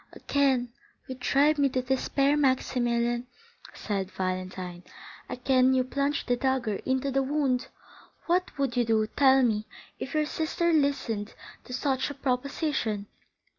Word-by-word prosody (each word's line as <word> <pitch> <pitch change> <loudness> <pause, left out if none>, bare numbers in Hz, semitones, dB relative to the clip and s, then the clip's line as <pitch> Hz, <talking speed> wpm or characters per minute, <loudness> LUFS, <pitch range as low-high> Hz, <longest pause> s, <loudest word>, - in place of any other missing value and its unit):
"Again 260 -4 +1 0.3
you 260 - -4
drive 280 +4 +2
me 280 -1 +4
to 255 0 -1
despair, 275 +2 +1
Maximilian," 240 -3 +1 0.5
said 195 -3 -3
Valentine, 185 -1 -4 0.5
"again 255 +1 +3
you 255 - +3
plunge 280 +3 -1
the 245 - +2
dagger 255 -5 0
into 260 +1 0
the 270 +1 +2
wound! 270 -2 0 0.6
What 355 -1 0
would 275 -3 -1
you 245 - +3
do, 220 -1 +2
tell 265 +3 +4
me, 215 -3 +1 0.3
if 270 - -5
your 305 0 +2
sister 330 +2 0
listened 275 -8 0 0.3
to 250 - -8
such 265 +1 0
a 285 - -6
proposition?" 260 -5 -1
260 Hz, 135 wpm, -28 LUFS, 235-280 Hz, 0.6 s, me